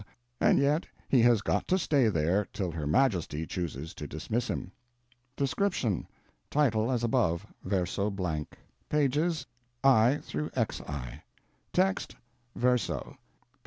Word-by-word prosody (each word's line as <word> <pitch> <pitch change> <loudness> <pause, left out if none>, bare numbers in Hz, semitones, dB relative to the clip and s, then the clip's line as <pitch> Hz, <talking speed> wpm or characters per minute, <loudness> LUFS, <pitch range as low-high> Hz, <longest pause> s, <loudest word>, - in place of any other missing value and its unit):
and - - +4
yet 145 +4 +2 0.2
he 130 - +4
has 115 -3 +4
got - - 0
to 185 - +3
stay 145 -8 +3
there 90 +3 +1
till 95 -4 -2
Her 80 -3 -4
Majesty 85 - +1
chooses 80 -4 -4
to 75 - -7
dismiss 110 - -2
him.) 90 - -4 0.7
DESCRIPTION: 140 - 0 0.4
Title 115 -6 +2
as 120 -2 0
above, 110 -9 +1 0.2
verso 95 +2 0
blank; 90 -7 -3 0.3
pp. 150 +3 +1 0.4
[i] 135 +1 +5
xi, 75 - -3 0.5
text; 190 +1 +1 0.4
verso 125 0 0
p. - - -24
110 Hz, 120 wpm, -29 LUFS, 85-135 Hz, 0.7 s, i